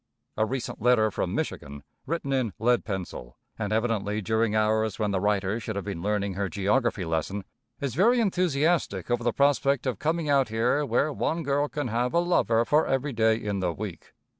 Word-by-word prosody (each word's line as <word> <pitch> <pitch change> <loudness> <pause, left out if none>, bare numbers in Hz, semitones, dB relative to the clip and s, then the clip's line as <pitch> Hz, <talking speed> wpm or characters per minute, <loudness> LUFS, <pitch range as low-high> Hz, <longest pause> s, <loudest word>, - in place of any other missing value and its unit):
A 110 0 +1
recent 130 -3 -4
letter 110 -2 +4
from - - -2
Michigan, 70 0 -4 0.2
written 155 -3 -2
in 125 -7 0
lead 120 +2 +2
pencil, 90 - -6 0.2
and 105 -2 -2
evidently 110 -2 0
during 110 +2 0
hours 110 -1 +1
when 105 -2 0
the 95 - 0
writer 100 +1 0
should 110 -1 -5
have 100 - -4
been 95 -5 -4
learning 100 0 -1
her 100 +1 -2
geography 105 0 0
lesson, 80 +5 -2 0.4
is 140 -4 -3
very 230 - +4
enthusiastic 165 - +1
over 120 0 +1
the 120 - +2
prospect 140 0 +2
of 125 -7 -2
coming 160 0 -1
out 135 -4 +3
here 120 +6 +1
where 140 +6 +1
one 165 +4 -1
girl 145 +1 +1
can 145 -4 -3
have 120 +5 -1
a - - +5
lover 120 -10 +2
for 150 +5 +3
every 135 +1 -1
day 110 -1 +3
in 105 -3 -3
the 90 -2 0
week. 90 -2 -7
115 Hz, 190 wpm, -27 LUFS, 100-140 Hz, 0.4 s, a